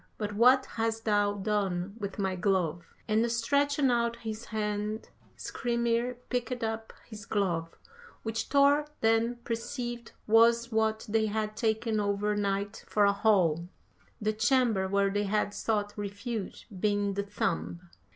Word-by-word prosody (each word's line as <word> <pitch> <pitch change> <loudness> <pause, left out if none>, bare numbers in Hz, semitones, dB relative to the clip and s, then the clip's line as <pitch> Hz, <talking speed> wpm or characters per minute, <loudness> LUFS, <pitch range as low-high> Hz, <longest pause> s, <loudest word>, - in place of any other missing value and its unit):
But 210 -1 -3
what 250 +5 +5
hast 225 0 -2
thou 205 -1 +2
done 195 -2 -1
with 200 -2 -5
my 190 -2 0
glove?' 175 -3 -1
And 225 +2 +2
stretching 280 +3 +2
out 235 -1 +1
his 225 0 -6
hand 210 0 -3 0.3
Skrymir 235 0 -1
picked 250 -1 -2
up 225 0 -3 0.2
his 215 -2 -9
glove, 170 -6 -1 0.5
which 225 0 -2
Thor 285 +1 +4
then 225 +2 +3
perceived 240 0 -4
was 230 +2 +4
what 220 0 +1
they 220 +1 +2
had 215 0 -2
taken 220 0 0
over 205 0 0
night 200 0 -2
for 205 -1 +3
a 200 - +4
hall, 180 -6 +2 0.5
the 215 0 0
chamber 220 -3 +2
where 200 0 +2
they 205 +1 0
had 205 0 0
sought 205 -2 -1
refuge 205 +1 -5
being 205 0 +1
the 200 - -1
thumb. 180 -3 -3
215 Hz, 140 wpm, -29 LUFS, 200-230 Hz, 0.5 s, what